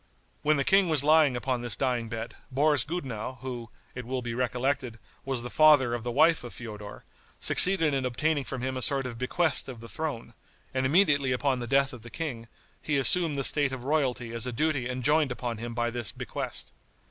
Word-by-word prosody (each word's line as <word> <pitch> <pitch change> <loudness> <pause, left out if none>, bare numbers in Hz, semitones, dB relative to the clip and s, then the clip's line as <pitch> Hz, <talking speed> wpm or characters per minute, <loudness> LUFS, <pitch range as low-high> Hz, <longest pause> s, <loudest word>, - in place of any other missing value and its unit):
When 150 0 +2
the 140 - +1
king 195 +3 +3
was 155 -4 +4
lying 150 -4 +4
upon 125 0 -2
this 120 -4 -4
dying 125 -3 -1
bed, 115 +1 -6
Boris 145 0 +2
Gudenow, 130 -7 -5
who, 120 -3 -6 0.2
it 125 - -6
will 125 +1 -4
be 120 -1 -4
recollected, 125 0 -2 0.3
was 130 -3 -3
the 120 - -6
father 150 -6 +5
of 120 - -3
the 120 - -3
wife 155 +4 +3
of 120 - -9
Feodor, 105 -3 -9 0.4
succeeded 170 -5 +4
in 135 -1 -1
obtaining 145 +4 0
from 130 -1 -6
him 130 0 -2
a - - -4
sort 135 +1 0
of 120 -2 -6
bequest 155 +3 0
of 125 -3 -8
the 115 - -10
throne, 135 -6 -5 0.4
and 130 0 0
immediately 145 -4 +3
upon 130 0 0
the 120 - -5
death 135 +2 +2
of 120 - -10
the 120 - -11
king, 120 -5 -5 0.3
he 150 -2 0
assumed 155 +2 +5
the 135 - -1
state 145 0 +4
of 130 -2 -6
royalty 130 -5 -1
as 115 +1 -2
a - - -2
duty 135 -1 -1
enjoined 140 +3 +1
upon 120 -2 -4
him 115 0 -6
by 120 0 -1
this 120 -3 -4
bequest. - - -6
130 Hz, 205 wpm, -27 LUFS, 120-145 Hz, 0.4 s, father